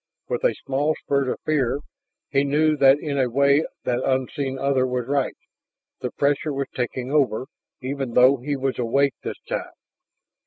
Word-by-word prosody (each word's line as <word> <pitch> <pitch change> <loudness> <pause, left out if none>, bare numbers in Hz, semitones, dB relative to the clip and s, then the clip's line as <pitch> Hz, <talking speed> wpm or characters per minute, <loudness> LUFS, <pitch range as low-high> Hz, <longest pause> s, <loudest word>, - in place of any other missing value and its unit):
With - - -2
a - - +3
small 145 +3 +1
spurt 140 -2 -1
of - - -3
fear 140 -3 +1 0.5
he 140 -1 +3
knew 155 +2 +2
that 135 -1 +6
in 145 -3 -2
a 130 -2 +2
way 140 +4 +4 0.2
that 125 0 0
unseen 135 +1 -1
other 135 -1 +1
was 125 -1 -2
right; 140 0 -1 0.6
the - - -3
pressure 145 +2 0
was 140 -1 -3
taking 125 +1 -3
over, 130 -5 +2 0.4
even 135 -2 -3
though 130 +2 +6
he 140 +4 -3
was 135 -1 -2
awake 135 +4 +2
this - - -5
time. - - -3
135 Hz, 165 wpm, -23 LUFS, 130-140 Hz, 0.6 s, that